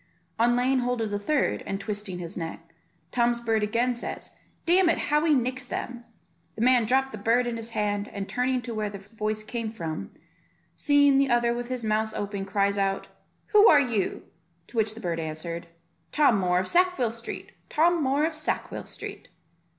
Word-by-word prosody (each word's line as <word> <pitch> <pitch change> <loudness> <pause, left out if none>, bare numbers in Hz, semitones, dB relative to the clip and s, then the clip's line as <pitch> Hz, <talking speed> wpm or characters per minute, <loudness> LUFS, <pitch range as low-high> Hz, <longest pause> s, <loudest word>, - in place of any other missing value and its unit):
On 240 +1 +4
laying 255 +2 +2
hold 245 -1 -1
of 220 -2 -2
the 205 - -1
third, 290 +8 0
and 195 - -2
twisting 205 -2 -4
his 175 +1 -7
neck, 165 -1 -7 0.4
Tom's 240 -1 +2
bird 225 -2 0
again 235 +4 +1
says, 240 - -5 0.3
"Damn 350 +1 +5
it, 330 - +2
how 300 +1 +1
he 315 -2 +4
nicks 255 0 -1
them." 245 -1 -5 0.5
The 220 - -2
man 250 -2 +5
dropped 265 +3 +2
the 215 - -7
bird 230 +4 +2
in 240 -1 -2
his 230 0 -5
hand, 205 -1 0
and 200 -1 -5
turning 250 0 0
to 235 0 -5
where 215 -1 -2
the 200 - -7
voice 215 +1 -4
came 230 0 -4
from, 165 -8 -5 0.7
seeing 285 -2 +4
the 275 -1 +2
other 240 -1 +3
with 240 0 -4
his 250 -3 -3
mouth 220 0 0
open, 200 -1 -3
cries 200 0 +1
out, 195 0 -1 0.4
"Who 425 0 +7
are 295 - +7
you?" 235 -8 -1 0.4
to 240 - -11
which 215 0 +1
the 225 - -9
bird 170 -2 -2
answered, 165 +2 -5 0.4
"Tom 280 -9 +4
Moor 180 -1 +2
of 185 +1 0
Sackville 355 -10 +3
Street, 230 0 -7 0.2
Tom 335 +2 +3
Moor 280 +3 +2
of 325 - -1
Sackville 310 0 -3
Street." - - -8
230 Hz, 190 wpm, -26 LUFS, 205-255 Hz, 0.7 s, Who